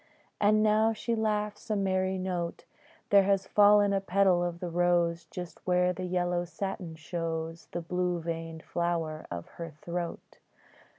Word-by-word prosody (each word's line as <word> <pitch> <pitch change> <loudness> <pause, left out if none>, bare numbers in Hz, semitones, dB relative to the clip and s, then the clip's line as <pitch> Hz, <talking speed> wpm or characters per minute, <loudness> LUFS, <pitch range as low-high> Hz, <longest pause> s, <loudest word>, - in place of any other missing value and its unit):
And 215 +1 +4
now 220 +1 +4
she 230 +2 -2
laughs 210 -2 -1
a 215 - +1
merry 190 -1 +1
note: 180 -2 -3 0.5
There 200 -1 +8
has 195 -1 +2
fallen 205 0 +5
a 195 - +1
petal 190 -2 +3
of 175 -1 -3
the 175 -1 -4
rose 170 -1 +2
Just 180 -2 -7
where 180 0 +3
the 185 0 -5
yellow 175 -1 0
satin 175 -1 -5
shows 165 0 -4
The 175 - -3
blue 180 +1 -1
veined 165 -1 -5
flower 165 -3 -2
of 85 -1 -5
her 170 -1 -7
throat. 170 +3 -6
180 Hz, 155 wpm, -29 LUFS, 170-195 Hz, 0.5 s, There